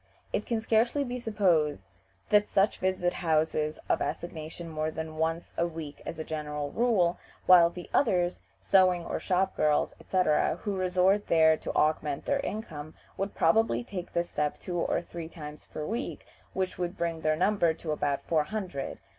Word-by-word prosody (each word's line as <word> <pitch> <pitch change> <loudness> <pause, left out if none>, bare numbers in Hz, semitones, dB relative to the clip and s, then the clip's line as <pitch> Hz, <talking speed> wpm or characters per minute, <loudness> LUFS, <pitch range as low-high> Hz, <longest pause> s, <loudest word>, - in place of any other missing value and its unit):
It 210 - -1
can 230 -2 0
scarcely 235 +6 +2
be 250 -1 -4
supposed 175 - +1 0.5
that 210 0 +4
such 195 +2 +2
visit 185 -1 0
houses 155 -2 0
of - - +1
assignation 165 0 -5
more 155 -1 -2
than 160 0 -6
once 165 +1 -1
a 170 - +2
week 160 -3 -8
as 165 - -5
a 160 - -3
general 150 -2 -4
rule, 215 -8 +2 0.3
while 175 -2 +8
the 175 0 -9
others, 180 -9 +2 0.2
sewing 185 -3 +3
or - - -3
shop 190 0 0
girls, 150 -1 +2
etc., 180 -5 +2
who 205 -2 -1
resort 185 +2 +2
there 160 -1 +5
to - - -6
augment 150 -2 +1
their 280 - +1
income, 155 - -5 0.2
would 195 +1 -3
probably 225 +9 +3
take 185 -6 -7
this 170 0 0
step 150 0 -1
two 175 -1 -4
or 170 - 0
three 170 -2 -7
times 150 -3 -10
per 150 - -4
week, 235 - -4 0.3
which 185 -1 -2
would 175 +1 -3
bring 165 -1 -2
their 155 0 +2
number 180 0 +3
to 160 0 -5
about 145 -2 -1
four 155 -3 +1
hundred. 185 -8 -4
170 Hz, 170 wpm, -29 LUFS, 155-195 Hz, 0.5 s, while